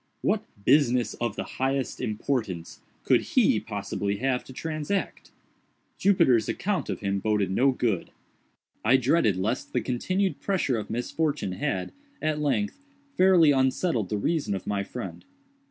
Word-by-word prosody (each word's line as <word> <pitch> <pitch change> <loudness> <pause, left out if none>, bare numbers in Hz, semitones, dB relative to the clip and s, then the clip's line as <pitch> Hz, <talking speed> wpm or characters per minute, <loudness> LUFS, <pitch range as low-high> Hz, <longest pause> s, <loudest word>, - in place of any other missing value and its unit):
What - - 0 0.2
"business 125 -3 +3
of 120 -4 -1
the - - -3
highest 135 0 -2
importance" 110 -6 -3 0.2
could - - +4
he - - +5
possibly 100 0 -3
have 125 +2 0
to - - -11
transact? 155 +7 -3 0.7
Jupiter's 170 - +4
account 200 - -1
of 95 - -3
him 100 -1 0
boded 105 -2 0
no 130 +8 +3
good. 115 -8 -1 0.7
I 120 +5 +5
dreaded 130 - +2
lest 110 +7 -2
the - - +2
continued 185 +10 -1
pressure 170 - 0
of 105 - -7
misfortune 135 0 -1
had, 90 0 -2 0.3
at 155 -1 -1
length, 210 - -1 0.3
fairly 180 -5 +6
unsettled 130 - +1
the 105 - -1
reason 145 -2 0
of 95 - -6
my 100 -1 -1
friend. 125 +5 -7
125 Hz, 140 wpm, -26 LUFS, 105-155 Hz, 0.7 s, fairly